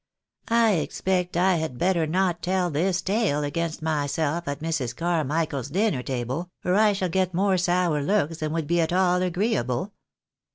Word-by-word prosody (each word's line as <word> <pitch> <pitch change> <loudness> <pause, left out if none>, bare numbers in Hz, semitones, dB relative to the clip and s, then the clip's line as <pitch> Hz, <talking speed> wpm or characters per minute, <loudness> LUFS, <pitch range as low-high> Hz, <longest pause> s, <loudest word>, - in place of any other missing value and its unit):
I 230 -1 +4
expect 180 +1 -1
I 185 0 +3
had 155 -6 -3
better 175 0 +1
not 175 +1 0
tell 180 0 0
this 175 +4 0
tale 195 -8 +1
against 165 +2 -3
myself 155 +2 -1
at 140 0 -3
Mrs. 150 -7 -2
Carmichael's 160 -4 -1
dinner 185 - +1
table, 130 +7 -3 0.2
or 180 - +2
I 210 +1 +4
shall 195 -2 -1
get 185 0 0
more 195 +1 +2
sour 175 -3 +1
looks 165 -1 0
than 155 -1 -2
would 165 -1 -1
be 170 +3 +1
at 160 - 0
aU 180 0 +3
agreeable. 180 - -1
170 Hz, 165 wpm, -25 LUFS, 150-185 Hz, 0.2 s, I